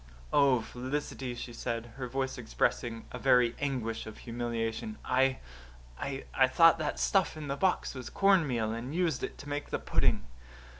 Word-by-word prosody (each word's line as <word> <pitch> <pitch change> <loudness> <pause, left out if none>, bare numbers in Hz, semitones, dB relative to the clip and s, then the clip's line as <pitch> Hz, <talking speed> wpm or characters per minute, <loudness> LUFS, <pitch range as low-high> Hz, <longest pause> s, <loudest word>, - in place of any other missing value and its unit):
"Oh, 135 -4 +5
Felicity," 130 0 -4
she 120 0 -7
said, 115 0 -4
her 130 -2 -3
voice 130 +1 -2
expressing 115 - -1
a - - -6
very 125 -3 +4
anguish 120 -6 -2
of 110 - -9
humiliation, 120 - -3
"I 130 +1 +3 0.6
I 135 -1 0
thought 165 +4 +6
that 150 -2 -2
stuff 190 -5 +2
in 150 -2 -6
the 140 - 0
box 185 +5 +1
was 130 -2 -7
cornmeal 150 - +3
and 120 +6 -5
used 175 -3 +1
it - - -4
to 140 - -10
make 145 0 -3
the - - 0
pudding." - - +1
130 Hz, 160 wpm, -31 LUFS, 120-145 Hz, 0.6 s, thought